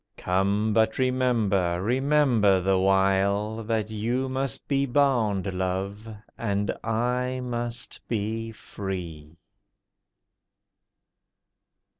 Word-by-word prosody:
Come! 100 +4 +1
but 110 0 +2
remember, 115 -9 +1
remember 125 -3 +3
the 95 +1 +2
while, 100 +3 +2
That 110 -1 -1
you 120 +5 -1
must 130 -1 -3
be 140 -1 +1
bound, 115 -8 +1
Love, 95 +4 -3 0.3
and 100 0 -1
I 125 +3 -1
must 120 -1 -5
be 115 +1 -2
free. 85 -7 -7
110 Hz, 85 wpm, -26 LUFS, 95-125 Hz, 0.3 s, remember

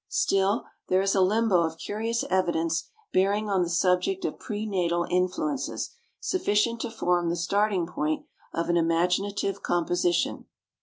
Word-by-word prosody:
Still, 195 +3 +1 0.2
there 185 +1 +3
is 195 - +2
a 195 - +3
limbo 200 -1 +3
of 160 -1 -2
curious 225 +5 -2
evidence 170 -3 0 0.2
bearing 205 +3 +2
on 190 -2 +3
the 175 - 0
subject 180 - +1
of - - -3
pre 215 -1 -4
natal 175 -4 0
influences 185 - -1 0.3
sufficient 235 - +1
to 240 - -3
form 180 -6 0
the 170 - 0
starting 200 +1 +1
point 155 -2 -2 0.3
of 170 - -2
an 175 - +2
imaginative 180 +4 +1
composition. 175 0 0
185 Hz, 145 wpm, -27 LUFS, 175-210 Hz, 0.3 s, there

